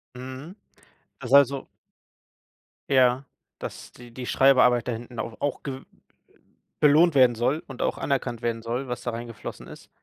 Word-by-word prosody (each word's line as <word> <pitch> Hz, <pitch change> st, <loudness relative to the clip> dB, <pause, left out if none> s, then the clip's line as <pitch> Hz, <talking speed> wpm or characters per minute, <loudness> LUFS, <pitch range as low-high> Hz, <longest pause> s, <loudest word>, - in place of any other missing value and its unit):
Mhm. 130 Hz, +8 st, -9 dB, 0.7 s
Das 125 Hz, -, -6 dB
also 140 Hz, -1 st, +5 dB, 1.2 s
Ja, 130 Hz, 0 st, +3 dB, 0.3 s
dass -, -, -8 dB
die 120 Hz, -1 st, -14 dB
die 125 Hz, 0 st, -7 dB
Schreibarbeit 125 Hz, -3 st, +4 dB
da -, -, 0 dB
hinten 120 Hz, +1 st, -7 dB
au 115 Hz, -, -4 dB
auch 145 Hz, -2 st, -2 dB
gew 135 Hz, -1 st, -5 dB, 1.0 s
belohnt 155 Hz, +3 st, +5 dB
werden 130 Hz, -3 st, +5 dB
soll 135 Hz, +7 st, 0 dB
und 135 Hz, -3 st, -8 dB
auch -, -, -1 dB
anerkannt 125 Hz, -4 st, -2 dB
werden 115 Hz, -1 st, -2 dB
soll, 120 Hz, +3 st, -3 dB
was 125 Hz, -, -5 dB
da 120 Hz, -, -2 dB
reingeflossen 115 Hz, -1 st, -8 dB
ist. -, -, -13 dB
125 Hz, 150 wpm, -25 LUFS, 120-135 Hz, 1.2 s, also